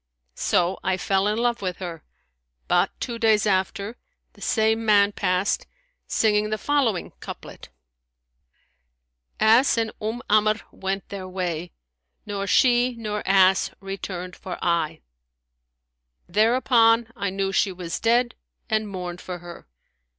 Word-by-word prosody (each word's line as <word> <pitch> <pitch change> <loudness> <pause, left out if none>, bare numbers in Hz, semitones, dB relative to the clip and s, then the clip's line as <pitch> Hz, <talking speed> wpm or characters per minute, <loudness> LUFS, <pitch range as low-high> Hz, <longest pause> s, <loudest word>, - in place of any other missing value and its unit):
So 175 - +1
I 190 0 +1
fell 195 +1 +1
in 210 +1 0
love 235 -1 0
with 185 -2 -3
her; 170 -4 -7 0.6
but, - - +3
two 235 -2 -4
days 220 -2 +3
after, 200 +3 -1 0.4
the - - -19
same 220 0 +1
man 205 -2 +4
passed, 185 -1 0 0.4
singing 210 -1 +2
the 215 - -1
following 255 -9 0
couplet, - - -9 1.7
Ass 230 +4 +5
and 225 -1 0
Umm 225 +3 -3
Amr' 215 +1 +3
went 195 0 -4
their 190 -2 -6
way; 175 -2 -3 0.3
* 65 0 -52
Nor 200 -1 -3
she, 245 +3 +3
nor 210 -2 -4
ass 190 0 +4
returned 190 -2 -6
for 185 - -7
aye.' 165 -2 0 1.3
Thereupon 230 +2 +3
I 200 - -2
knew 195 0 -2
she 195 0 +2
was 175 -2 -5
dead 240 +1 +2 0.4
and 215 0 +1
mourned 180 -2 -6
for 180 -1 -6
her. 175 - -11
200 Hz, 130 wpm, -24 LUFS, 185-225 Hz, 1.7 s, Ass